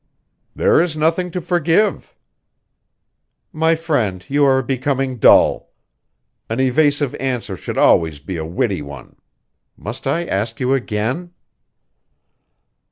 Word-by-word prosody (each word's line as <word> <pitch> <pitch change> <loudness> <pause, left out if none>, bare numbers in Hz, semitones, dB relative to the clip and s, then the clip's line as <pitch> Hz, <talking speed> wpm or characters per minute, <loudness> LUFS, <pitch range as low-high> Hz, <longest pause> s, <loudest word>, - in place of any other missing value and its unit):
"There - - +3
is 165 -3 -2
nothing 165 +4 0
to 180 - -4
forgive." 175 +4 0 1.4
"My 160 +1 +2
friend, 125 - -2
you 145 +1 +1
are 130 -1 +3
becoming 135 0 -2
dull. - - +4 0.8
An 115 +3 -2
evasive 145 +1 +2
answer 125 -7 -3
should - - -7
always 80 -3 +3
be 85 +5 -7
a 80 - -4
witty 95 - -2
one. 70 -3 -11 0.6
Must - - -7
I 170 +1 0
ask 110 -2 -3
you 130 0 +1
again?" 130 +8 -2
135 Hz, 115 wpm, -19 LUFS, 110-160 Hz, 1.4 s, dull